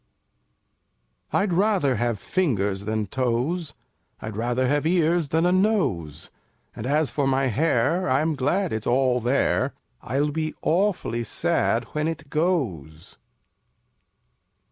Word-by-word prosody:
4 - - +1
I'd 195 -3 0
rather 180 - +2
have 120 -2 -1
fingers 100 - -1
than 110 0 -1
Toes; 130 - -2 0.4
I'd 110 -1 -6
rather 120 +3 0
have 145 +3 +1
Ears 170 -2 +2
than 160 +3 +2
a 180 - +3
Nose 140 - 0 0.4
And 110 - -5
as 150 0 +1
for 140 -2 0
my 135 0 +2
hair, 160 - +1
I'm 155 +5 +2
glad 155 +7 0
it's 110 0 -3
all 125 0 +2
there, 125 +4 +1 0.3
I'll 140 +5 -1
be 155 +1 -3
awfully 170 - 0
sad 115 +1 0
when 150 +1 0
it 160 -3 -5
goes! 115 - -2
140 Hz, 125 wpm, -24 LUFS, 115-165 Hz, 0.4 s, a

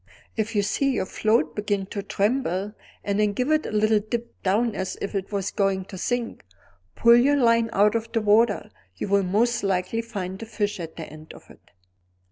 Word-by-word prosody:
If 220 0 -2
you 205 - +3
see 275 +7 +1
your 220 - -1
float 205 -7 +1
begin 205 -2 -1
to 200 - -3
tremble, 205 -1 -1 0.3
and 200 0 -1
then 210 -1 +2
give 250 +7 -1
a 310 - +5
little 215 -4 +2
dip 235 +3 -5
down 215 +4 +1
as 190 -2 -4
if 200 - -4
it 195 0 -3
was 200 -2 -2
going 195 -2 0
to 195 -1 -9
sink, 245 +2 -2 0.5
pull 235 0 +6
your 275 +4 +4
line 230 -3 +3
out 210 0 +4
of 230 0 -2
the 225 - +1
water; 210 +1 +3 0.2
you - - -4
will 200 0 +3
most 230 +6 +1
likely 195 +3 0
find 195 -4 -6
a 225 - -7
fish 210 -2 -2
at 165 -2 -7
the 165 - -6
end 155 +1 -12
of - - -15
it. - - -20
210 Hz, 200 wpm, -24 LUFS, 195-230 Hz, 0.5 s, pull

